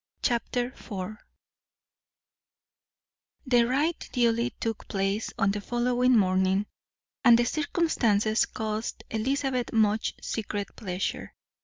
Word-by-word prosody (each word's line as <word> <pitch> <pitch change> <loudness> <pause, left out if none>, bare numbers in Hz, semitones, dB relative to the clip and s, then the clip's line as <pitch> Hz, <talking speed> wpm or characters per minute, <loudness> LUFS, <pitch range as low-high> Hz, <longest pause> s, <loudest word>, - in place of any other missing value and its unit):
Chapter 245 0 0
IV 205 -3 -6 2.3
The 245 -3 +4
ride 295 +7 +1
duly 235 0 +2
took 225 -2 -5
place 195 +2 -1
on 195 - +3
the 205 +1 -3
following 245 +2 +2
morning, 190 0 +2 0.6
and 240 -3 +8
the 240 - +2
circumstances 235 - +1
caused 215 +1 -4
Elizabeth 255 +2 -1
much 215 -1 +2
secret 205 -2 -4
pleasure. 185 -3 -4
225 Hz, 100 wpm, -27 LUFS, 205-245 Hz, 2.3 s, and